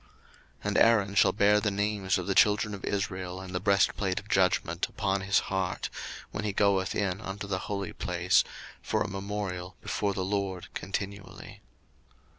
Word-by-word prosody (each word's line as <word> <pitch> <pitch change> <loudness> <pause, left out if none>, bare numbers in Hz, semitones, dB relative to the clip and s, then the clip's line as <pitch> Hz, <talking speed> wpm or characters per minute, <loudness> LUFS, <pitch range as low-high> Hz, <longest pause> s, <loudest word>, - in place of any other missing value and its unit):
02:028:029 - - -28 0.5
And 105 0 0
Aaron 105 -4 +4
shall 100 - +5
bear 105 +1 +4
the 105 - +1
names 100 -1 0
of - - -3
the 100 - 0
children 105 +1 +4
of 100 - -7
Israel 95 -2 -2
in 95 -1 -8
the 90 - 0
breastplate 100 0 +2
of 105 - -15
judgment 90 -3 +2
upon 95 -2 -1
his 100 +1 +2
heart, 95 -1 -2 0.4
when 105 - -4
he 105 -2 -1
goeth 100 -2 +2
in 100 0 -1
unto 100 0 -5
the 95 -1 -2
holy 100 -2 -3
place, - - +2 0.4
for - - 0
a - - -4
memorial 95 -2 -4
before 100 -2 -1
the 95 - -1
LORD 95 -2 -2
continually. 100 0 -6
100 Hz, 170 wpm, -29 LUFS, 95-105 Hz, 0.5 s, shall